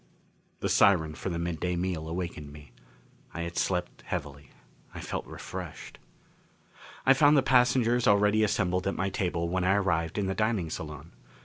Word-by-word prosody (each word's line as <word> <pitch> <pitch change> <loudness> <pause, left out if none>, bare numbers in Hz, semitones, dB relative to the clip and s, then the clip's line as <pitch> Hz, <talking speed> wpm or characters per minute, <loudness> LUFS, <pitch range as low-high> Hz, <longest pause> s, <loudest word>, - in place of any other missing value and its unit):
The - - 0
siren 80 -6 +4
for 85 - -5
the 85 - -3
midday 85 +1 -2
meal 85 -3 -2
awakened 85 -4 -5
me. 75 -3 -13 0.6
I 85 - -3
had 85 0 -6
slept 90 -2 -2
heavily. 70 -1 -5 0.5
I - - -6
felt - - -5
refreshed. - - -8 1.1
I 135 - +7
found 145 +2 +5
the 135 - +4
passengers 125 -2 +3
already 105 +1 +4
assembled 95 -3 0
at 100 - -1
my 95 +1 -1
table 85 -3 -1
when 90 +1 -1
I 95 +2 +3
arrived 85 -4 0
in 100 - 0
the 95 - -1
dining 105 -5 -1
salon. 75 -3 -7
90 Hz, 165 wpm, -28 LUFS, 85-105 Hz, 1.1 s, I